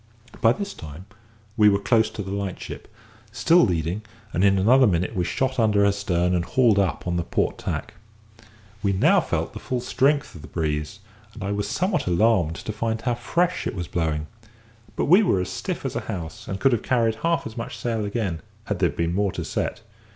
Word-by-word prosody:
By 115 - +6
this 200 +10 -3
time 80 +4 -10 0.5
we 105 -2 +6
were 100 - +3
close 110 +3 +2
to 105 - -6
the 95 - -6
light 100 -2 -3
ship, - - -9 0.4
still 165 +10 +4
leading, 85 0 0 0.3
and 90 - +1
in 100 -1 +5
another 125 +7 +5
minute 90 -2 0
we 90 - +1
shot 130 +7 -1
under 105 -3 +4
her 100 - +4
stern 90 -3 0
and 90 -1 +1
hauled 115 0 +3
up 95 -3 0
on 90 -1 -1
the 85 - 0
port - - -1
tack. - - -4 0.9
We 100 -1 +1
now 95 - +4
felt - - -2
the - - -7
full 125 0 -2
strength 140 +4 +1
of 80 - -11
the 75 - -10
breeze, 75 +3 -3 0.3
and 110 - -7
I 100 - -2
was 100 0 -2
somewhat 185 - 0
alarmed 90 -3 +3
to 110 - -5
find 110 +1 -2
how 120 +2 0
fresh 170 +9 0
it - - -4
was 90 -3 -4
blowing. 80 -3 -1 0.7
But - - 0
we 180 +8 +6
were 185 - +2
as 90 - -2
stiff - - -4
as - - -3
a - - 0
house, 80 -4 -6
and 95 - -4
could 135 - +4
have 120 - +1
carried 115 -3 +1
half 170 0 +1
as 110 - -7
much 115 - -5
sail 115 -3 -2
again, 100 -6 -2 0.2
had 105 -4 -3
there 90 -2 +3
been 85 +3 -2
more 100 +1 +1
to - - -4
set. - - -3
100 Hz, 215 wpm, -24 LUFS, 90-115 Hz, 0.9 s, By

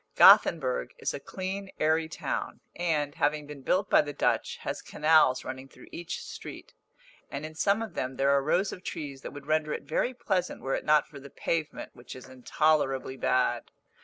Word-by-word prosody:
Gothenburg - - +5
is 450 - -2
a - - -4
clean 195 +1 -5
airy 160 +1 +2
town, 155 -4 -4 0.2
and, 155 -4 0
having 150 -1 0
been 145 -1 -10
built 185 +8 +1
by - - +5
the 145 -1 -6
Dutch, - - 0
has - - -3
canals 150 -4 +3
running 130 +1 -6
through - - -16
each 170 0 -6
street; - - -9 0.6
and 140 +2 -5
in 155 - -8
some 200 +7 +1
of 225 - -7
them 130 +1 -3
there 135 +2 +2
are 140 0 +4
rows 175 +8 +1
of 185 - -9
trees 145 -7 -6
that - - -6
would 145 -1 -10
render 155 0 0
it - - -5
very 255 - -1
pleasant 185 -7 -1
were 135 - -1
it - - -2
not 150 0 +4
for 140 - -11
the 140 +1 -11
pavement, 155 +2 -3
which 120 - -11
is 130 - -11
intolerably 135 +1 0
bad. 130 -1 0
150 Hz, 190 wpm, -28 LUFS, 140-175 Hz, 0.6 s, Gothenburg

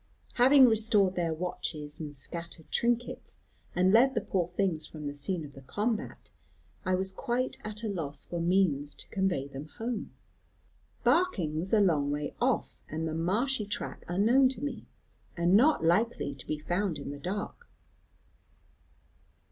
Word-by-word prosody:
"Having 260 +2 +7
restored 215 -4 +3
their 170 -3 0
watches, 155 -2 -4
and 150 -2 -6
scattered 170 +3 -7
trinkets, 240 0 -1 0.4
and 185 +1 +4
led 260 +4 +5
the - - +1
poor 180 -4 -1
things 175 -3 -1
from 155 -2 -9
the 145 - -3
scene 155 +3 -2
of 145 - -11
the 135 - -12
combat, 215 - -3 0.5
I 185 - +1
was 190 +1 0
quite 255 +5 -2
at 215 +1 -4
a - - -1
loss 165 -8 -4
for 175 - -4
means 165 -5 +1
to - - -8
convey 190 -8 0
them 140 +2 -8
home. 230 -1 -4 0.9
Barking 240 - +2
was 185 +4 -2
a 220 - +5
long 155 -8 +3
way 145 0 -2
off, - - 0
and 160 +1 -3
the 160 - -3
marshy 210 +8 0
track 205 - -4
unknown 230 +9 +4
to 265 +1 -6
me, 290 - -4 0.5
and 170 +1 +3
not 270 - +5
likely 175 -3 +2
to 135 - -11
be 155 - -1
found 175 +3 -1
in - - -6
the 145 - -7
dark. 205 - -5
185 Hz, 160 wpm, -30 LUFS, 155-225 Hz, 0.9 s, Having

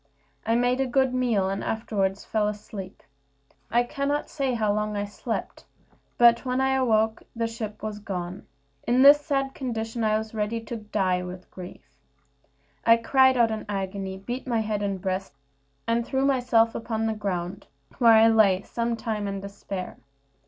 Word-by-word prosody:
I 225 - +3
made 245 +2 +2
a 265 - 0
good 265 0 +2
meal, 235 -7 +1
and 195 +1 -3
afterward 200 -3 -1
fell 210 0 -1
asleep. 205 -2 -7 0.7
I 240 +1 +3
cannot 285 +3 -2
tell 270 -4 -1
how 215 -3 +1
long 210 0 -1
I 205 - -1
slept, 205 - -5 0.5
but 235 -1 +6
when 255 -1 -1
I 265 0 +2
awoke 220 -4 +2
the 230 0 -1
ship 225 -2 -6
was 215 -1 -4
gone. 185 -3 -6 0.4
In 250 +2 +4
this 290 +1 +8
sad 275 -2 -1
condition, 225 -3 -3
I 215 0 +3
was 220 0 -6
ready 215 +1 -1
to 230 +1 -6
die 195 -4 0
with 180 0 -9
grief. 180 -1 -10 1.0
I 230 0 +6
cried 260 +2 +4
out 230 -2 +4
in 220 -1 -3
agony, 195 -1 -3
beat 245 +7 -6
my 230 -3 +1
head 215 -1 -2
and 200 -2 -2
breast, 185 -4 -3 0.5
and 230 +1 +1
threw 265 +3 0
myself 245 -4 +3
upon 225 -1 -2
the 220 - 0
ground, 195 -2 -4 0.3
where 230 -2 +7
I 220 0 +7
lay 205 -4 +4
some 235 0 -2
time 215 -3 -3
in 195 0 -3
despair. 195 -1 -7
220 Hz, 170 wpm, -26 LUFS, 200-240 Hz, 1.0 s, this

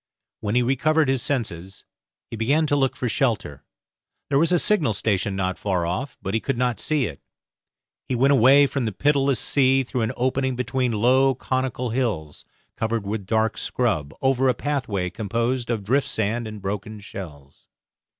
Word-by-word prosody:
When 105 +1 -2
he 125 - +4
recovered 150 +4 +2
his 135 -2 +2
senses 95 - -3 0.4
he - - -8
began 140 +8 +2
to 145 - +1
look 135 -2 +1
for 125 - -2
shelter; 110 - -1 0.7
there 140 - +3
was 165 +3 +2
a 175 - +4
signal 165 - +2
station 100 -1 -1
not 95 -1 -2
far 90 -4 0
off, 95 +11 -3
but 95 - -3
he 110 - +2
could 135 +2 -2
not 125 -2 0
see 150 -4 0
it. 80 -8 -7 0.9
He 130 - 0
went 135 +4 +3
away 140 +2 +6
from 135 -2 -2
the 110 - -2
pitiless 140 +1 +2
sea 135 -1 +3
through 125 0 -3
an 110 +1 0
opening 130 +1 0
between 125 0 -1
low 130 +5 +3
conical 130 -1 -2
hills, 105 - -2 0.3
covered 110 -2 -2
with 100 -1 -4
dark 110 0 +1
scrub, 95 - -1
over 135 0 +3
a 125 - +2
pathway 110 -11 -2
composed 115 +3 -2
of 115 -4 -1
drift 135 +8 +1
sand 110 +2 -1
and 105 -2 -9
broken 105 +2 -4
shells. 75 -9 -10
120 Hz, 175 wpm, -23 LUFS, 105-135 Hz, 0.9 s, away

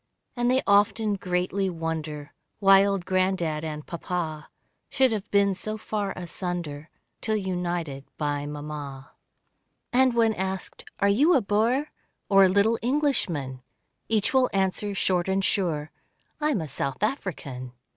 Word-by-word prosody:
And 240 -1 +1
they 260 +1 +3
often 205 +1 +3
greatly 185 +1 -1
wonder 160 -3 -4 0.2
Why 195 -1 +7
old 195 -3 0
granddad 185 -4 0
and 150 -1 -5
Papa, 170 -3 -4 0.4
Should 260 -2 +3
have 210 -2 -3
been 200 -1 +3
so 215 +3 -4
far 210 -2 -3
asunder, 175 -4 -5 0.3
Till 220 - 0
united 175 -7 -2
by 145 -1 -1
mamma. 145 -2 -7 0.8
And 255 -1 +4
when 225 -1 +4
asked, 190 -1 -4
"Are 200 - +3
you 285 - +4
a 265 - +4
Boer. 230 +8 +1 0.4
Or 195 -1 +7
a - - +4
little 205 +4 +3
Englishman?" 225 - 0 0.5
Each 220 +1 +1
will 260 -1 +4
answer, 195 +1 0
short 185 -1 +1
and 190 0 +1
sure, 160 -6 0 0.5
"I 300 0 +1
am 225 - +1
a 160 - -4
South 140 +3 -3
African." 140 - -3
190 Hz, 140 wpm, -26 LUFS, 155-215 Hz, 0.8 s, Why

